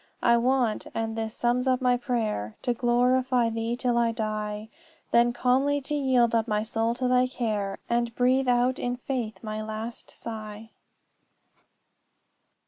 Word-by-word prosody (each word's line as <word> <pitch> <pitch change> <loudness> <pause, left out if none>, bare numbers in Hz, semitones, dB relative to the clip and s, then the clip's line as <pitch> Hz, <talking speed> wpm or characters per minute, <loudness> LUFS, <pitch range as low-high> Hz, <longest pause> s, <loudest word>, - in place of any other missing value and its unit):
"'I 235 0 +5
want 245 -2 +1
and 225 0 -2
this 225 0 -4
sums 245 +2 +1
up 255 -1 +3
my 250 -1 +3
prayer 220 - -2
To 245 - +1
glorify 245 0 +2
thee 225 +1 -2
till 245 -1 +1
I 235 -1 +2
die; 215 -1 -3 0.4
Then 240 0 +4
calmly 265 +4 +2
to 285 +3 -4
yield 260 -5 +2
up 225 0 +2
my 210 -1 0
soul 225 +1 -1
to 250 +1 -1
thy 250 0 +3
care, 210 -6 -2
And 235 -1 0
breathe 255 +1 +2
out 245 +1 +2
in 245 0 -1
faith 245 -4 -4
my 215 0 -4
last 220 +2 -6
sigh.'" 220 -1 -8
235 Hz, 150 wpm, -27 LUFS, 220-250 Hz, 0.4 s, I